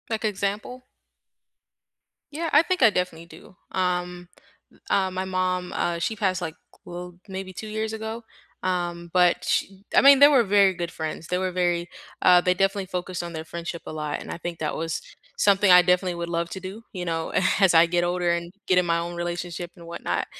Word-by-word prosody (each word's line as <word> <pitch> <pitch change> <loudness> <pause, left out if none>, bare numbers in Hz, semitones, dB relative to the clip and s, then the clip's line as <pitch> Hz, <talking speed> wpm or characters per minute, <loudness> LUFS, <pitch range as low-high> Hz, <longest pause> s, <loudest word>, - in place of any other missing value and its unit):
Like, 220 -1 -2
example? 210 +5 -3 1.5
Yeah, 325 +3 -3
I 295 - +8
think 370 -1 -1
I 235 - +8
definitely 180 -4 -3
do, 185 - -15 0.2
um, 180 -1 -2 0.4
u - - -24
uh, 190 -1 +2
my 185 +1 -3
mom, 185 -1 -1
uh, 170 -1 -1
she 220 +6 -1
passed, 190 -4 0
like, 160 -2 -4 0.3
well, 180 0 -8
maybe 190 -1 -6
2 215 +4 -8
years 220 +1 -3
ago, 220 +1 -5 0.4
um, 175 -2 -2
but 180 -1 +3
sh - - +1 0.3
I - - +6
mean, 275 0 +8
they 285 +1 +9
were 270 -5 +5
very 200 -2 +4
good 170 -1 -4
friends. 160 0 -5
They 180 - 0
were 185 0 -1
very 175 -1 0 0.3
uh, 180 -1 +7
they 180 0 +2
definitely 195 +1 0
focused 180 -1 -4
on 170 -1 -7
their 160 -1 -5
friendship 170 +1 -6
a - - -6
lot, 150 -1 -4
and - - -8
I - - -5
think 170 -1 -6
that 155 - -2
was 165 0 -3 0.4
something 200 -1 +4
I 180 0 +9
definitely 180 0 +1
would 170 0 -4
love 170 0 -1
to 190 - -5
do, 195 +5 -8
you 180 -2 -4
know, 165 -2 -3 0.3
as 195 -3 +5
I 165 0 +7
get 175 +1 0
older, 175 0 0
and 170 +1 -3
get 185 - +2
in 180 - +4
my 170 -1 +1
own 170 +1 -4
relationship 175 0 -4
and 170 -2 -13
whatnot, 170 - -3
180 Hz, 205 wpm, -25 LUFS, 170-195 Hz, 1.5 s, they